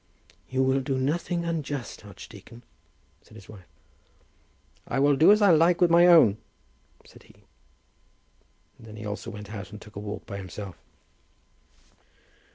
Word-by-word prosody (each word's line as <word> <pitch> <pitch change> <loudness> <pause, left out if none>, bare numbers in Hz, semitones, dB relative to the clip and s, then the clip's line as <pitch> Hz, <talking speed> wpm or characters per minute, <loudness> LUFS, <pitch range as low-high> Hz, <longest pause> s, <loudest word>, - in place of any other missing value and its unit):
"You 130 0 0
will 130 +1 +1
do 135 0 -2
nothing 170 +5 -2
unjust, 145 -8 -5
archdeacon," 110 +4 -13 0.6
said - - -20
his 95 - -14
wife. 95 -5 -14 1.2
"I 125 - -3
will 140 +1 +3
do 160 +8 +6
as 210 0 +4
I 200 - +6
like 165 +2 +4
with 175 -2 +3
my 170 +1 +6
own," 155 - +6 0.7
said - - -17
he. - - -21 1.4
And 115 - -14
then 105 - -11
he 105 0 -9
also 105 0 -6
went 105 0 -9
out 100 -3 -7
and 105 - -10
took 105 0 -16
a - - -5
walk 105 0 -7
by 100 - -7
himself. 95 -1 -8
130 Hz, 155 wpm, -26 LUFS, 105-165 Hz, 1.4 s, do